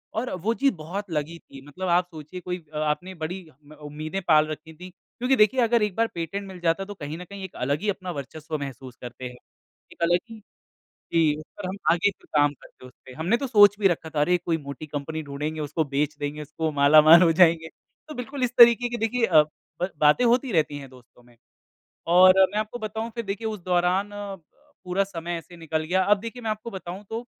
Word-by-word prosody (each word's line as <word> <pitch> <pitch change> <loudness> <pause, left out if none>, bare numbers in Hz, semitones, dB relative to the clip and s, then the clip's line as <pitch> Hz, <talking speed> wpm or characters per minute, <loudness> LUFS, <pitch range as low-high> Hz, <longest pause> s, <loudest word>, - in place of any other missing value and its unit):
और 245 +3 -2
वो 225 +4 +1
चीज़ 275 0 +2
बहुत 180 +5 -6
लगी 155 +2 -3
थी। 135 - -14
मतलब 185 +6 -5
आप 175 +1 +3
सोचिए 155 +3 -9
कोई 180 -1 -5
आपने 155 +5 -2
बड़ी 180 +1 -5
अ, 150 +2 -19
उम्मीदें 155 +5 -6
पाल 155 -1 +5
रखी 155 +1 -8
थी। 180 +3 -11
क्योंकि 250 +8 -2
देखिए 215 +4 +4
अगर 235 -1 +3
एक 205 -3 -1
बार 230 0 +2
पेटेंट 185 +4 -4
मिल 185 -2 -10
जाता 175 +3 0
तो 205 - -8
कहीं 150 -2 -7
न 180 - -8
कहीं 200 +1 -9
एक 190 - -8
अलग 140 +4 -1
ही 210 - -1
अपना 185 -2 -3
वर्चस्व 155 +2 -6
महसूस 130 -2 -8
करते 125 +1 -8
हैं। 125 0 -7 0.6
एक - - -17
अलग 175 +1 +3
ही 225 -1 -10 0.7
जी, 160 -3 +3
उस 155 - -10
पर 195 -3 -5
हम 190 - -4 0.2
आगे 175 +4 +3
भी 195 - -14
काम 145 0 +4
करते 130 - -17
उस 125 - -14
पे। 130 - -11
हमने 170 - 0
तो 275 - -3
सोच 205 -3 +6
भी 195 - +5
रखा 160 -2 -2
था 150 -1 -1
अरे! 180 +4 +3
कोई 170 -1 -1
मोटी 140 0 -8
कंपनी 150 +2 -4
ढूंढेंगे 150 +2 -4
उसको 150 +2 -1
बेच 145 +2 -1
देंगे 145 +1 -4
उसको, 155 +2 -3
मालामाल 155 +4 +7
हो 165 -2 +5
जाएँगे। 165 -1 +4 0.4
तो 305 - -8
बिल्कुल 255 +2 -5
इस 250 0 -1
तरीके 235 0 +7
की 240 - -3
देखिए 230 +1 +1
अ, 160 -6 +6 0.4
ब 180 - 0
बातें 150 +11 +4
होती 245 +1 +2
रहती 155 -4 +1
हैं 135 -2 -10
दोस्तों 125 -1 -19
में। 120 -1 -22 0.8
और 185 +1 +8 0.2
मैं 210 - -1
आपको 215 +3 -3
बताऊँ 220 +1 -4
फिर 235 -1 -4
देखिए 205 +3 -4
उस 210 -3 -5
दौरान 180 +3 +1
पूरा 195 - -5
समय 175 -2 -5
ऐसे 170 +2 -13
निकल 160 -1 -3
गया। 185 +3 +1
अब 205 0 +4
देखिए 230 +2 -7
मैं 220 - -2
आपको 215 +2 -5
बताऊँ 190 +1 -7
तो 230 +2 -5
175 Hz, 220 wpm, -25 LUFS, 150-205 Hz, 0.8 s, और